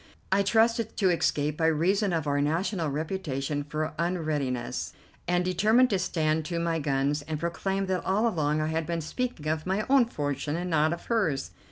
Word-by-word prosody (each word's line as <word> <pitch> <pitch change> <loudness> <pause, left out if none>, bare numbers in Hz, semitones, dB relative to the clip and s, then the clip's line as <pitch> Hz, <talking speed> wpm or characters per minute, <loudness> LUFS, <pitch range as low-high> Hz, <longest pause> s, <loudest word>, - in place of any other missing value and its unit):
I 195 +1 +4
trusted 225 +2 +2
to 190 -3 +3
escape 150 -3 0
by 160 - +2
reason 185 +6 +2
of 165 -3 -1
our 145 0 +1
national 165 +3 0
reputation 145 -2 -2
for 155 +2 -3
unreadiness, 145 -8 -2 0.3
and 180 0 +1
determined 220 +7 +3
to 195 - +2
stand 160 -3 0
to 170 +1 -3
my 165 -1 0
guns 140 0 0
and 155 +1 -4
proclaim 190 +4 -1
that 185 -2 -1
all 205 +5 +2
along 155 -7 0
I 155 - 0
had 160 0 -1
been 170 -1 -1
speaking 200 - -3
of 155 +2 -1
my 195 +3 0
own 270 -3 +6
fortune 145 - -3
and 175 +1 -3
not 155 0 +3
of 170 - -5
hers. 155 - 0
165 Hz, 185 wpm, -28 LUFS, 150-190 Hz, 0.3 s, own